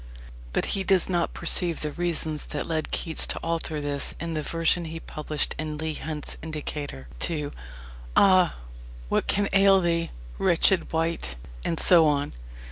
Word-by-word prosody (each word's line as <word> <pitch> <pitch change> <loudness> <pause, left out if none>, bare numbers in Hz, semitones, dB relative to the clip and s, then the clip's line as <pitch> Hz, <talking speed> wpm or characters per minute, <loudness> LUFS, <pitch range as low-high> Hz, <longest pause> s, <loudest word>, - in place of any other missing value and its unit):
But - - 0
he 195 - -1
does 190 -2 +3
not 175 -2 -1
perceive 170 0 +3
the 150 - -1
reasons 160 -2 -2
that 150 - -4
led 160 -2 -3
Keats 165 -2 +1
to - - -2
alter 165 -2 -2
this 145 -1 0
in 165 +1 -4
the 155 - -2
version 165 +2 +1
he 165 0 -6
published 150 -1 -2
in 155 -1 -4
Leigh 160 0 -3
Hunt's 150 -1 -5
Indicator 150 - -5
to: 150 - -1 0.6
Ah, 185 -3 +5 0.5
what - - 0
can 200 0 +1
ail 195 0 +6
thee, 170 -2 0 0.3
wretched 175 +1 +3
wight, 165 +1 -1 0.3
and 165 - -1
so 170 -3 +6
on. 145 -1 0
165 Hz, 155 wpm, -25 LUFS, 150-175 Hz, 0.6 s, ail